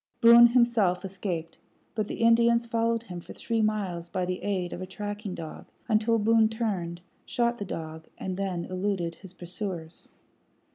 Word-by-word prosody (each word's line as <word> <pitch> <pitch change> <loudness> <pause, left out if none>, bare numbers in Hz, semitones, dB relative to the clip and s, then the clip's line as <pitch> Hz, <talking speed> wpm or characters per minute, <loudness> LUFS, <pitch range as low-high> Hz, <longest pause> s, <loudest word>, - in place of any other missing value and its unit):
Boone 235 +1 +9
himself 230 -7 +2
escaped, 180 -4 -4 0.3
but 215 -2 -1
the - - -5
Indians 235 0 +5
followed 230 0 0
him 180 -6 -7
for - - -11
three 230 -1 -1
miles 195 -6 -1
by 185 0 -1
the 180 0 -3
aid 185 -4 -2
of 175 - -6
a 185 - -5
tracking 205 0 -5
dog, 160 -2 -8 0.2
until 225 0 +3
Boone 220 0 +4
turned, 190 -7 -3 0.2
shot 240 -1 0
the 205 - -3
dog, 160 -2 -6
and 185 -1 -4
then 185 -3 -2
eluded 185 -2 -2
his 185 +2 -13
pursuers. 180 -2 -6
200 Hz, 160 wpm, -28 LUFS, 180-230 Hz, 0.3 s, Boone